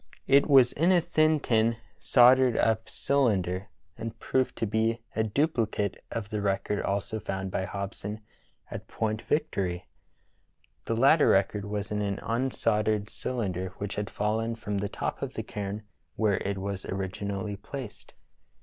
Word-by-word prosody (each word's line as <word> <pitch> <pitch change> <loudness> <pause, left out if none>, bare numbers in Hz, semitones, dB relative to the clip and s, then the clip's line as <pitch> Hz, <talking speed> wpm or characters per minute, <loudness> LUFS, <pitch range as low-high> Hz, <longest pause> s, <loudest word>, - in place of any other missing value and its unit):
It 140 +1 +5
was 130 -3 +6
in 170 +5 +3
a 180 - +6
thin 155 -2 +2
tin 115 -3 +2 0.2
soldered 125 -1 +5
up 110 0 +1
cylinder, 100 -9 +1 0.3
and 115 0 -6
proved 130 +3 0
to - - -1
be 110 +2 +1 0.2
a 110 - +2
dupli 115 0 +1
cate 100 -2 -1
of 110 -2 -5
the 105 -1 -1
record 100 +1 0
also 100 +2 -2
found 95 -2 -4
by 95 - -2
Hobson 100 +2 -5 0.5
at - - -7
Point 110 0 -2
Vic 150 +1 0
tory. 90 -2 -2 1.0
The 115 - -1
latter 140 +5 +5
record 100 +1 +2
was 105 0 -4
in 105 0 0
an 100 -1 -1
unsoldered 110 -4 0
cylinder 95 -7 -3
which 100 0 -4
had 105 -1 -3
fallen 110 +2 -1
from 105 -3 -3
the 100 0 -2
top - - -4
of - - -4
the - - -3
cairn 105 +1 -5 0.3
where 105 -3 +2
it 100 0 -2
was 95 0 -4
originally 100 +1 -3
placed. 120 +3 -8
105 Hz, 160 wpm, -28 LUFS, 100-120 Hz, 1.0 s, was